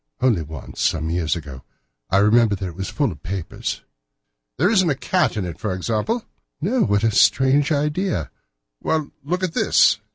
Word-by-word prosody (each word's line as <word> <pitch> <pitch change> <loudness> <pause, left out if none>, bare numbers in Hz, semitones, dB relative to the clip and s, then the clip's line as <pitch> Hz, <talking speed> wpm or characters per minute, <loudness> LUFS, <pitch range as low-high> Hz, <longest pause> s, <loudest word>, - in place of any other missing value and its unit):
"Only 120 -9 +2
once, 80 -2 -8
some 80 +2 0
years 85 -2 0
ago. 70 -6 -8 0.5
I 95 - +3
remember 105 +1 +4
that 95 - -5
it - - -9
was 95 +1 -4
full 140 -6 0
of 75 -4 -11
papers." 95 -2 -4 0.7
"There 180 - +3
isn't 190 -6 +3
a 145 - +1
cat 175 -2 0
in 100 - -1
it, 85 -3 -7
for 100 -4 -2
example?" 115 - -1 0.3
"No. 225 +10 0
What 100 - +2
a 115 - +3
strange 135 +7 +4
idea!" 150 - -1 0.5
"Well, 155 -2 -1
look 180 +6 -2
at 180 -3 -1
this!" - - +4
115 Hz, 175 wpm, -22 LUFS, -, 0.7 s, remember